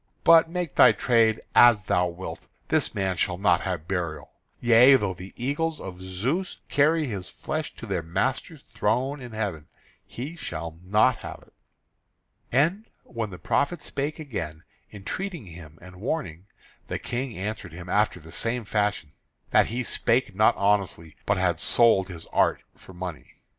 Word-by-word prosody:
But, 165 -1 +7
make 175 -3 -3
thy - - +7
trade 115 -3 +2
as 120 -4 +7
thou 90 -1 +2
wilt, 85 +2 -8 0.2
this - - +1
man 95 -2 0
shall 90 +2 0
not 95 -3 +3
have 85 -4 -4
burial; 85 -6 -3 0.3
yea, 120 +3 +7
though 105 -7 0
the 90 +2 -10
eagles 150 +6 -1
of 90 -1 -8
Zeus 115 - -2
carry 155 +2 +3
his 100 -8 -5
flesh 155 0 -5
to - - -9
their 95 -5 -2
master's 130 - -2
throne 125 +6 -1
in 120 -2 -9
heaven, 95 -8 -3 0.4
he 140 +8 -7
shall 85 - -6
not 105 +6 +3
have - - -9
it." - - -28 1.0
And 165 - +2 0.2
when 115 -3 -4
the 90 - -9
prophet 140 - 0
spake 145 +2 -3
again, 85 - -6 0.3
entreating 160 - -5
him, 80 -3 -12
and 90 0 -12
warning, 100 - -3 0.4
the - - -3
King 125 -2 -4
answered 105 -2 -5
him 85 +1 -9
after 105 -1 +1
the 80 0 -14
same 115 +4 -2
fashion, 105 -8 -1 0.4
that - - +5
he 120 +3 -2
spake 115 -2 0
not 110 +3 +4
honestly, 100 -6 0
but 100 - +2
had 90 -3 +1
sold 115 -4 +4
his 85 -4 -9
art - - +2
for 95 - -15
money. 90 -3 -7
105 Hz, 160 wpm, -26 LUFS, 90-130 Hz, 1.0 s, But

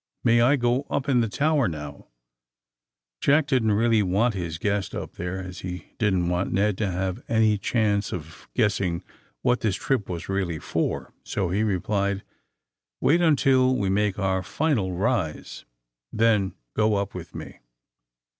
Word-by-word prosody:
* - - -64
' - - -56
May 120 -1 +4
I 130 +5 +5
go 125 +1 +1
np 140 0 -1
in 125 -3 +4
the 115 - 0
tower, 150 +3 +2
now! 75 -3 -7 0.4
' - - -66
' - - -66
Jack 145 +2 +4
didn't 125 -7 +2
really 115 +1 +3
want 105 +5 +2
his 85 -4 -4
guest 100 +2 -1
up - - -5
there, 90 +2 -4
as 90 -1 -7
he 90 0 -7
didn't 95 -5 +2
want 90 +2 0
Ned 100 +2 +2
to 105 -3 0
have 95 0 -2
any 110 -2 +3
chance 105 -1 +1
of 80 -2 -8
guess 105 -5 +2
ing 85 -1 -1 0.4
what 125 -1 +3
this 105 -5 0
trip 130 -7 -1
was 85 -3 -5
really 95 -4 -1
for, - - -2
so 95 -4 -2
he 100 +3 +1
replied: 100 -1 0 0.8
^'Wait 170 +5 +3
until 135 -5 +4
we 100 -5 0
make 105 0 +1
our 95 -2 0
final 115 - 0
rise. 95 -4 -2 0.5
Then 105 -4 +2 0.2
go 105 0 +2
up 100 0 -2
with 85 -2 -9
me. - - -8
100 Hz, 175 wpm, -25 LUFS, 90-120 Hz, 0.8 s, I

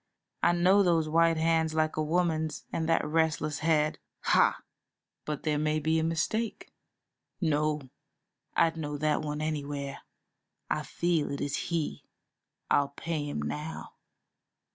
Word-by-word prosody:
I - - +4
know 185 +4 +5
those 170 -4 +3
white 165 +1 +3
hands 160 0 +2
like 155 0 +1
a 155 - 0
woman's 160 -1 0
and 160 0 -1
that 165 - +3
restless 155 -1 0
head. 155 -1 +2 0.2
Ha!" - - +4 0.7
"But 150 -2 -4
there 150 -2 +1
may 155 0 +1
be 160 +2 +1
a - - 0
mistake." 185 +8 -1 0.7
"No. 150 -3 +1 0.8
I'd 165 0 +3
know 150 -2 -3
that 150 +1 +1
one 150 0 -3
anywhere; 145 -2 -3 0.7
I - - +1
feel 170 -3 0
it 140 - -3
is 145 0 -1
he. 165 -3 -2 0.7
I'll 140 -1 +4
pay 155 -3 -2
him 75 - -3
now. 75 +2 -5
155 Hz, 140 wpm, -29 LUFS, 150-165 Hz, 0.8 s, know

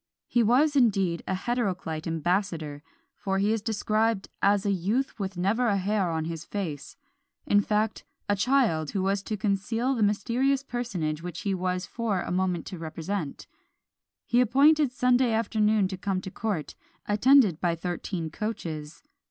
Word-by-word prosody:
He 240 - +2
was 265 +7 +3
indeed 195 -9 +2
an 190 - 0
heteroclite 185 -8 -2
ambassador, 165 -3 -1 0.3
for 195 -1 -2
he 205 +3 +2
is 225 - -1
described 220 -1 0
"as 200 0 +3
a 200 - +2
youth 210 +9 -1
with 190 -2 -4
never 210 +7 +1
a 200 -3 +2
hair 195 -1 0
on 160 -1 -2
his 165 -1 -5
face;" 170 - -5 0.5
in 205 - +4
fact, 210 +1 -1 0.2
a 205 - +2
child 205 - +2
who 195 - -1
was 195 +1 +1
to 215 +1 -4
conceal 220 +6 0
the 235 - -2
mysterious 240 +7 +1
personage 190 - -3
which 175 -1 -6
he 200 - -1
was 185 0 -1
for 220 -6 -2
a - - -5
moment 180 -2 0
to 180 - -7
represent. 165 0 -4 0.8
He 245 - +3
appointed 280 +4 +4
Sunday 250 -2 +2
afternoon 215 -2 +2
to 190 - -5
come 190 0 -1
to 190 - -7
court, 200 -9 -3 0.3
attended 210 - +4
by 170 -2 +1
thirteen 175 -1 -4
coaches. 160 -7 -5
200 Hz, 160 wpm, -27 LUFS, 180-230 Hz, 0.8 s, in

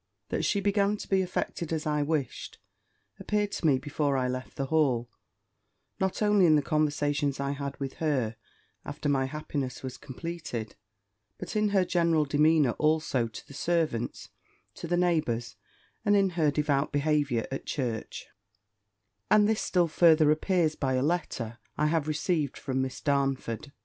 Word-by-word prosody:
That - - -1
she 200 - +1
began 200 +1 +2
to - - -8
be 195 -1 +2
affected 175 -2 -3
as 160 0 -2
I 150 -1 +1
wished, 145 -2 -2 0.6
appeared 210 -1 -1
to 165 - -1
me 140 -3 +4
before 145 0 -1
I 130 -1 +1
left 130 +1 -5
the 135 - -2
Hall, 130 -6 +1 0.9
not 190 +2 0
only 205 -3 +5
in 155 - +6
the 145 - +2
conversations 145 -2 0
I 140 0 -1
had 140 -1 -5
with 135 -1 -4
her 130 -8 0 0.5
after - - -5
my 135 -2 +2
happiness 140 -2 -4
was 130 -1 -6
completed; 150 -5 -6 0.6
but - - -7
in 210 0 +2
her 195 -2 +3
general 170 -3 +2
demeanour 150 -1 +3
also 150 -6 +1
to 110 - -11
the - - -12
servants, 155 -7 -1 0.4
to - - -7
the 175 +1 +1
neighbours, 155 -10 0 0.5
and 205 - +3
in 195 -2 +3
her 165 -4 +2
devout 145 -1 0
behaviour 145 -5 +1
at 135 - -5
church: 120 -6 -3 1.0
and 210 -1 +5
this 220 0 +1
still 175 -2 +2
further 160 -2 +5
appears 160 0 +1
by 135 -3 -1
a 130 - +1
letter 130 -8 -2 0.2
I 150 - +2
have 155 -1 +1
received 155 -1 -1
from 130 -1 -2
Miss 130 -1 -4
Darnford. 135 -3 -1
150 Hz, 160 wpm, -28 LUFS, 135-170 Hz, 1.0 s, in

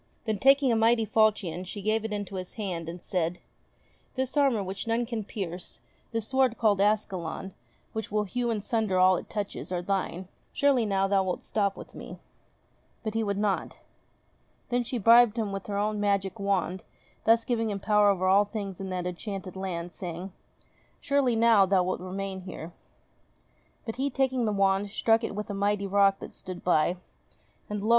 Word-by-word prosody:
Then, 215 -3 -1
taking 275 +1 +5
a - - +3
mighty 225 0 +3
falchion, 205 -5 +1
she 185 +3 -7
gave 215 +1 +1
it 220 - -4
into 205 -2 -4
his 185 -1 -7
hand, 180 -6 -4
and 175 +2 -7
said: 175 -1 -2 0.8
"This 260 +1 -2
armour 270 -8 +3
which 190 +3 -5
none 230 +1 +1
can 230 -2 -3
pierce, 185 -4 -6 0.3
this 225 -2 -2
sword 265 -3 +2
called 205 -4 +3
Ascalon, 195 -3 -1 0.4
which 220 -2 -4
will 210 0 +1
hew 240 +4 -2
in 220 -3 -1
sunder 215 -3 0
all 185 0 +6
it - - -6
touches, 205 -3 -4
are 175 -1 -2
thine; 190 -1 -2 0.3
surely 270 -6 +3
now 195 -1 +1
thou 195 0 +3
wilt 185 -1 -2
stop 200 -2 0
with - - -10
me - - -9 0.4
?" - - -39
But 215 -2 -3
he 225 0 0
would 200 -2 -1
not. 205 -2 -1 0.9
Then 245 0 +1
she 245 +1 -3
bribed 235 +1 +6
him 215 -3 -1
with 195 0 -5
her 200 -1 -2
own 210 +1 0
magic 200 0 0
wand, 190 -2 -1 0.4
thus 225 +1 +4
giving 225 -2 0
him 200 -1 -3
power 210 0 +4
over 185 -2 +1
all 200 +2 +5
things 200 -3 -5
in 190 - -4
that 180 -1 -3
enchanted 185 +1 -5
land, 180 -2 -4
saying: 180 +1 -6 0.7
"Surely 275 -4 +2
now 225 -3 +5
wilt - - -9 0.3
thou - - -9
remain 195 0 -4
here 175 -2 -8 0.5
?" - - -36
But 225 0 -5
he, 275 +2 0
taking 260 -2 +1
the 215 - +1
wand, 195 0 +2
struck 225 +2 +2
with 210 -2 -4
it - - -5
a - - -3
mighty 200 0 0
rock 195 0 +4
that - - -8
stood 185 -2 -8
by; 175 0 +2 0.7
and 210 -1 -3
lo 220 - -1
205 Hz, 190 wpm, -28 LUFS, 190-225 Hz, 0.9 s, all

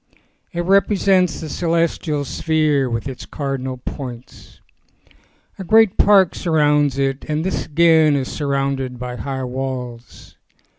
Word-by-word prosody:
It 175 - -3
represents 190 -1 +2
the 160 - -5
celestial 165 -2 -1
sphere 150 -2 0
with 115 +1 -3
its 130 -2 -8
cardinal 135 -2 -4
points. 125 -1 -9 1.0
A - - -4
great 220 +1 +4
park 195 -4 +5
surrounds 150 -4 +1
it 135 0 -1
and 155 0 -2
this 190 - -2
again 160 -1 +4
is 135 -2 -1
surrounded 135 -3 -2
by 125 0 -6
high 135 -1 -4
walls. 125 -2 -6
145 Hz, 120 wpm, -19 LUFS, 130-165 Hz, 1.0 s, park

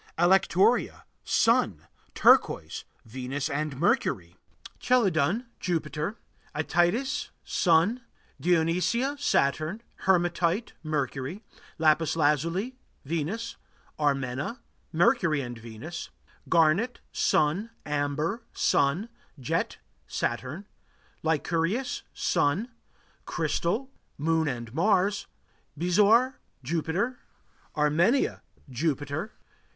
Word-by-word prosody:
Alectoria 190 +5 +3 0.2
Sun. 110 - +2 0.3
Turquoise - - +3 0.2
Venus 130 +4 -4
and 145 -1 -2
Mercury. 90 - +1 0.4
Chelidon 205 - +2
Jupiter. 160 +3 -2 0.4
Ætites 175 - +1
Sun. 180 +8 +2 0.4
Dionesia 180 - +2
Saturn. 160 - +1 0.2
Hematite 175 +2 +2
Mercury. 150 - -3 0.3
Lapis 155 0 +3
lazuli 165 - +1 0.3
Venus. 170 +10 -3 0.4
Armena 140 - -1 0.3
Mercury 170 - +3
and 120 -2 -6
Venus. 115 +10 -7 0.4
Garnet 170 +9 +3
Sun. 175 +9 +1 0.2
Amber 150 - -1
Sun. 155 +11 +2 0.3
Jet 125 - -1 0.3
Saturn. 130 +11 -3 0.6
Lyncurius 165 - 0
Sun. 180 - +1 0.6
Crystal 170 - -1 0.3
Moon 160 +1 +1
and 120 -4 -4
Mars. 195 +4 +2 0.5
Bezoar 210 +9 +4 0.2
Jupiter. 170 - -1 0.6
Armenia 165 - +2 0.3
Jupiter. 145 - -2
165 Hz, 75 wpm, -27 LUFS, 145-200 Hz, 0.6 s, Bezoar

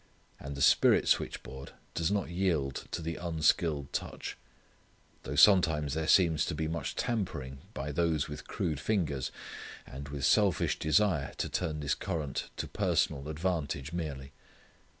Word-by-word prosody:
And 70 0 -6
the 70 - +1
spirit - - +5
switchboard 65 +1 -1 0.2
does 85 0 0
not 100 -4 -1
yield 85 -7 0
to 85 - -4
the 80 0 -3
unskilled 80 -3 +1
touch. - - -4 0.9
Though 70 - -5
sometimes 80 -4 +5
there 80 0 -1
seems 80 -4 +5
to 80 - -2
be 80 +1 -1
much 80 -3 -3
tampering 90 - -2 0.2
by 70 +2 -3
those 80 -1 +1
with 75 -1 -8
crude 75 -4 -2
fingers, 75 -9 -1 0.5
and 70 +1 -8
with 70 -1 -2
selfish 100 -6 +3
desire 80 -2 +2
to - - -2
turn 75 -1 -2
this 70 - +1
current 75 -5 -3
to - - -3
personal 70 +2 0
advantage 80 -3 -2
merely. 70 -5 -4
75 Hz, 145 wpm, -31 LUFS, 70-85 Hz, 0.9 s, spirit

